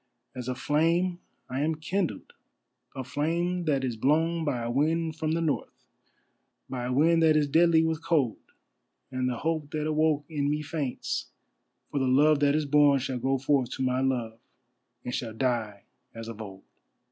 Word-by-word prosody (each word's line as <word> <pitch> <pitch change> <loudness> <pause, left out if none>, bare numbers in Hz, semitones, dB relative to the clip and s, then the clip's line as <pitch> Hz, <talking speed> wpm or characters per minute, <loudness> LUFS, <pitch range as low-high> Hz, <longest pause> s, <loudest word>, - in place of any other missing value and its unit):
As 125 -1 -6
a 130 - -2
flame 165 +6 +1 0.3
I 130 - -3
am 160 +2 +1
kindled, 175 +4 -3 0.6
a 130 - -4
flame 170 +6 -1
that 140 -4 +1
is 125 -3 -1
blown 160 +7 +1
by 125 -6 -1
a 120 - -2
wind 160 +4 0
from 160 -1 -1
the 165 - 0
North, 155 -3 -3 0.8
By 125 -2 -4
a 125 - -2
wind 165 +5 +4
that 155 -1 +5
is 150 -1 +2
deadly 160 +2 +4
with 160 0 -2
cold, 150 -9 +1 0.7
And 130 -1 -1
the 120 - -3
hope 155 -1 -2
that 150 -1 -1
awoke 155 -1 +1
in 145 -3 -1
me 150 +1 -1
faints, 145 -3 -3 0.6
for 140 - -1
the 130 - +1
Love 145 +3 +4
that 145 0 +3
is 155 -1 +1
born 145 0 +5
shall 130 -1 -3
go 135 +2 +1
forth 135 -1 +1
To 130 - -3
my 130 0 +1
Love, 120 -4 -1 0.7
and 125 - -4
shall 115 -3 -3
die 110 -5 -1 0.3
as 115 0 -7
of 115 -1 -7
old! 95 -2 -9
145 Hz, 180 wpm, -28 LUFS, 130-160 Hz, 0.8 s, that